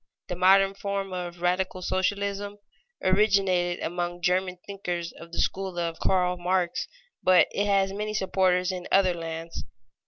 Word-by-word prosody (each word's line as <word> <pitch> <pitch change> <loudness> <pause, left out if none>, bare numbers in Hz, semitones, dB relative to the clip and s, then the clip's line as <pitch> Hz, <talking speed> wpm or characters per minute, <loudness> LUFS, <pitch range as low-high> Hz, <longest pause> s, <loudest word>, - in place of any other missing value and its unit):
The 180 - -2
modern 195 +2 +5
form 195 -1 -3
of 175 -1 -5
radical 185 +1 0
socialism 200 +2 -1 0.5
originated 185 -3 +2
among 175 0 -3
German 180 0 +1
thinkers 175 -4 -4
of 170 0 -13
the - - -7
school 190 -2 -1
of 170 -1 -2
Karl 180 -1 +1
Marx, 180 0 0 0.3
but 185 -1 +5
it 205 +1 0
has 195 -1 +2
many 210 +1 -3
supporters 185 -2 +2
in 180 -1 -6
other 190 -2 +4
lands. 165 0 -6
185 Hz, 145 wpm, -26 LUFS, 175-195 Hz, 0.5 s, modern